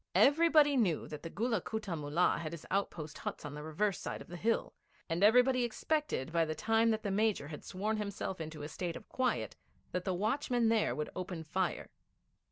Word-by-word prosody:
Everybody 300 Hz, -1 st, +6 dB
knew 190 Hz, -10 st, +1 dB
that 150 Hz, -1 st, -7 dB
the 165 Hz, -, -6 dB
Gulla 225 Hz, +2 st, 0 dB
Kutta 215 Hz, -5 st, -3 dB
Mullah 150 Hz, +3 st, +1 dB
had 160 Hz, -1 st, -4 dB
his 170 Hz, -, -8 dB
outpost 155 Hz, -6 st, -2 dB
huts -, -, -5 dB
on 145 Hz, -, -5 dB
the 150 Hz, -, -6 dB
reverse 175 Hz, +6 st, -1 dB
side -, -, -4 dB
of -, -, -12 dB
the 175 Hz, -, -7 dB
hill, 225 Hz, +6 st, 0 dB, 0.3 s
and 165 Hz, +4 st, 0 dB
everybody 250 Hz, +4 st, +5 dB
expected 250 Hz, -, -1 dB
by 165 Hz, 0 st, +3 dB
the 155 Hz, -1 st, -2 dB
time 225 Hz, +3 st, +3 dB
that 220 Hz, -1 st, 0 dB
the 200 Hz, -, -1 dB
Major 205 Hz, -7 st, +1 dB
had 150 Hz, -, -8 dB
sworn 210 Hz, +4 st, -2 dB
himself 200 Hz, -3 st, -4 dB
into 155 Hz, -1 st, -6 dB
a -, -, -3 dB
state 170 Hz, +1 st, -4 dB
of -, -, -9 dB
quiet 260 Hz, -1 st, -1 dB, 0.4 s
that 180 Hz, -, -2 dB
the 185 Hz, -1 st, -1 dB
watchmen 235 Hz, +3 st, +1 dB
there 225 Hz, -2 st, +2 dB
would 150 Hz, 0 st, -3 dB
open 180 Hz, -3 st, -4 dB
fire. 180 Hz, +3 st, -2 dB
195 Hz, 200 wpm, -33 LUFS, 160-225 Hz, 0.4 s, Everybody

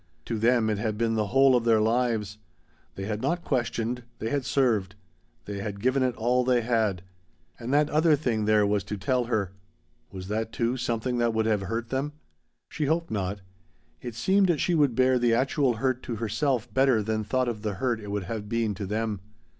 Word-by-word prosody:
To 115 Hz, -2 st, -3 dB
them, 115 Hz, 0 st, +3 dB
it 105 Hz, -, -2 dB
had 105 Hz, 0 st, -2 dB
been 115 Hz, 0 st, +1 dB
the 110 Hz, -2 st, 0 dB
whole 135 Hz, +3 st, +5 dB
of 120 Hz, -, +2 dB
their 115 Hz, -2 st, +4 dB
lives. 110 Hz, -2 st, 0 dB, 0.6 s
They 95 Hz, -, -5 dB
had 105 Hz, +1 st, -3 dB
not 170 Hz, 0 st, -1 dB
questioned; 120 Hz, -2 st, -1 dB, 0.2 s
they 110 Hz, -, -4 dB
had 140 Hz, -3 st, -1 dB
served. 110 Hz, -9 st, +1 dB, 0.5 s
They 100 Hz, -1 st, -5 dB
had 100 Hz, 0 st, -5 dB
given 130 Hz, +5 st, +1 dB
it 130 Hz, -2 st, +1 dB
all 125 Hz, +3 st, +1 dB
they 125 Hz, -1 st, +2 dB
had. 110 Hz, -6 st, 0 dB, 0.6 s
And 120 Hz, +2 st, -5 dB
that 145 Hz, +1 st, +4 dB
other 155 Hz, +1 st, +4 dB
thing 120 Hz, -7 st, -1 dB
there 105 Hz, -1 st, +4 dB
was 100 Hz, -1 st, +1 dB
to 105 Hz, -, -4 dB
tell 125 Hz, +5 st, 0 dB
her? 105 Hz, -6 st, -1 dB, 0.6 s
Was 95 Hz, -1 st, -8 dB
that, 110 Hz, +2 st, -2 dB
too, 120 Hz, +1 st, 0 dB
something 125 Hz, 0 st, -2 dB
that 115 Hz, -1 st, +1 dB
would 110 Hz, 0 st, +1 dB
have 110 Hz, -2 st, +1 dB
hurt 115 Hz, +4 st, -4 dB
them? 135 Hz, +3 st, -2 dB, 0.5 s
She 155 Hz, -, -3 dB
hoped 165 Hz, +3 st, 0 dB
not. 100 Hz, -1 st, -2 dB, 0.6 s
It 120 Hz, -2 st, -6 dB
seemed 185 Hz, -, +2 dB
she 175 Hz, -, +1 dB
could 145 Hz, -6 st, +3 dB
bear 130 Hz, 0 st, +3 dB
the 120 Hz, -1 st, +3 dB
actual 130 Hz, +1 st, +1 dB
hurt 130 Hz, +2 st, -1 dB
to 120 Hz, -, -5 dB
herself 115 Hz, +2 st, -1 dB
better 130 Hz, -5 st, +3 dB
than 110 Hz, 0 st, -1 dB
thought 130 Hz, +4 st, 0 dB
of 115 Hz, -3 st, -3 dB
the 105 Hz, -2 st, -3 dB
hurt 120 Hz, 0 st, -1 dB
it 105 Hz, -2 st, -8 dB
would 100 Hz, -1 st, -2 dB
have 105 Hz, +2 st, -5 dB
been 115 Hz, -2 st, 0 dB
to 100 Hz, 0 st, -5 dB
them. 105 Hz, -1 st, -2 dB
115 Hz, 205 wpm, -27 LUFS, 105-130 Hz, 0.6 s, whole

